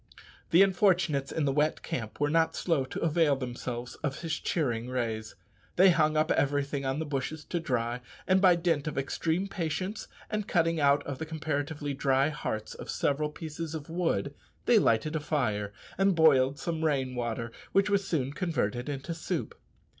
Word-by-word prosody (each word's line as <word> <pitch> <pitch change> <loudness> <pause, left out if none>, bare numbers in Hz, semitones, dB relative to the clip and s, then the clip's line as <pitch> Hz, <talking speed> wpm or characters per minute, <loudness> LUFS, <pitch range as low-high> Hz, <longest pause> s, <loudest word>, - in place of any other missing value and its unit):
The 175 +4 +7
unfortunates 175 -7 +2
in 160 - 0
the 140 - +2
wet 150 +2 +1
camp 110 -3 -5
were 145 0 +1
not 165 0 +2
slow 160 -7 +1
to 130 - -6
avail 160 -2 +3
themselves 125 -1 -5
of 145 -1 -3
his 165 -2 -2
cheering 120 -7 -1
rays. 115 -3 -3 0.4
They 185 +1 +7
hung 155 -2 +2
up 155 +1 +2
everything 140 0 +1
on 135 +1 0
the 160 - -2
bushes 145 +2 -3
to 175 - -2
dry, 125 -5 -1 0.2
and 185 0 +3
by 185 -3 +7
dint 165 -4 0
of 150 - -4
extreme 160 +7 -1
patience 185 +3 -3 0.2
and 210 -1 -3
cutting 165 -1 +2
out 145 0 +4 0.2
the - - -2
comparatively 145 -2 -3
dry 135 +1 +2
hearts 110 -7 -4
of - - -9
several 150 +1 0
pieces 160 +1 -6
of 155 0 -7
wood, 165 - 0 0.3
they - - +6
lighted 115 +8 +2
a - - +1
fire 115 -9 -1 0.3
and 195 -1 +4
boiled 140 -4 +5
some 160 0 -3
rain 135 -5 +1
water, 115 -1 -3 0.2
which 195 0 +3
was 200 -1 +1
soon 140 -4 -1
converted 145 - -1
into 145 +4 -4
soup. 165 - -3
150 Hz, 175 wpm, -29 LUFS, 130-165 Hz, 0.4 s, The